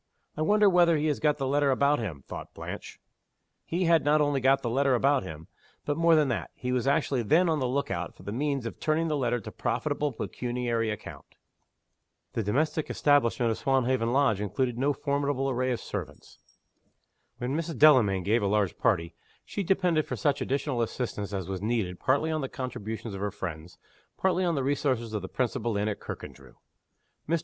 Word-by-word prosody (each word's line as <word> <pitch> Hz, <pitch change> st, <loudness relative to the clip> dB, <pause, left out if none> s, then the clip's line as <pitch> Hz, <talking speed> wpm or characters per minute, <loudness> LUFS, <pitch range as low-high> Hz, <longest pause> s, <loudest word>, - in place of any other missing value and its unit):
"I 155 Hz, -, -4 dB
wonder 210 Hz, +6 st, +4 dB
whether 175 Hz, -3 st, +5 dB
he 150 Hz, -, -1 dB
has 145 Hz, -, -1 dB
got 150 Hz, -1 st, +2 dB
the 135 Hz, -, -2 dB
letter 140 Hz, +1 st, +2 dB
about 140 Hz, +2 st, +3 dB
him?" 85 Hz, -, -5 dB
thought -, -, -8 dB
Blanche. -, -, -7 dB, 0.6 s
He 175 Hz, +3 st, -1 dB
had 165 Hz, -2 st, +4 dB
not 150 Hz, +1 st, +3 dB
only 145 Hz, -2 st, +1 dB
got 135 Hz, +1 st, +3 dB
the 120 Hz, -, -1 dB
letter 135 Hz, +1 st, +3 dB
about 135 Hz, +3 st, +3 dB
him 80 Hz, -3 st, -9 dB, 0.4 s
but, 145 Hz, -, 0 dB
more 165 Hz, +1 st, +4 dB
than 155 Hz, -2 st, +4 dB
that, 120 Hz, -, -2 dB
he 125 Hz, -, -4 dB
was 125 Hz, 0 st, 0 dB
actually 140 Hz, -2 st, +2 dB
then 160 Hz, -, +3 dB
on 160 Hz, -2 st, +1 dB
the 130 Hz, -, 0 dB
look 140 Hz, +3 st, -1 dB
out 85 Hz, 0 st, -4 dB
for -, -, -15 dB
the 100 Hz, -, -5 dB
means 140 Hz, +1 st, -1 dB
of 115 Hz, -, -6 dB
turning 160 Hz, +1 st, +1 dB
the 150 Hz, -, 0 dB
letter 120 Hz, -3 st, 0 dB
to 105 Hz, -, -9 dB
profitable 145 Hz, +4 st, -1 dB
pecuniary 120 Hz, -1 st, -2 dB
account. 105 Hz, -, -8 dB, 1.0 s
The 115 Hz, -, -1 dB
domestic 150 Hz, +9 st, 0 dB
establishment 125 Hz, -5 st, +2 dB
of 110 Hz, -, -3 dB
Swanhaven 130 Hz, -3 st, +1 dB
Lodge 125 Hz, -7 st, +2 dB
included 115 Hz, +5 st, -1 dB
no 135 Hz, +4 st, +1 dB
formidable 140 Hz, -1 st, -1 dB
array 130 Hz, +1 st, 0 dB
of 120 Hz, -, -1 dB
servants. -, -, -7 dB, 1.0 s
When 125 Hz, +3 st, -2 dB
Mrs. 165 Hz, 0 st, -3 dB
Delamayn 115 Hz, -11 st, +5 dB
gave 110 Hz, +5 st, +2 dB
a 100 Hz, -, +1 dB
large 100 Hz, -2 st, 0 dB
party, 85 Hz, -8 st, +1 dB, 0.3 s
she 205 Hz, -, -4 dB
depended 180 Hz, -4 st, +1 dB
for -, -, -3 dB
such 145 Hz, -3 st, 0 dB
additional 135 Hz, -2 st, -1 dB
assistance 110 Hz, -4 st, -3 dB
as 95 Hz, -3 st, -3 dB
was 95 Hz, -1 st, -4 dB
needed 105 Hz, -5 st, -1 dB
partly 145 Hz, +5 st, +1 dB
on 155 Hz, -1 st, -1 dB
the 135 Hz, -, -3 dB
contributions 110 Hz, -4 st, -5 dB
of 95 Hz, -, -6 dB
her 105 Hz, -, 0 dB
friends, 85 Hz, -4 st, -7 dB, 0.4 s
partly 185 Hz, -1 st, +1 dB
on 170 Hz, -2 st, +1 dB
the 135 Hz, -, -1 dB
resources 130 Hz, -5 st, 0 dB
of 105 Hz, -, -2 dB
the 95 Hz, -, -7 dB
principal 120 Hz, -3 st, -1 dB
inn 105 Hz, +1 st, 0 dB
at 105 Hz, -, -2 dB
Kirkandrew. -, -, -9 dB, 0.7 s
Mr. 165 Hz, 0 st, +2 dB
130 Hz, 195 wpm, -28 LUFS, 110-145 Hz, 1.0 s, whether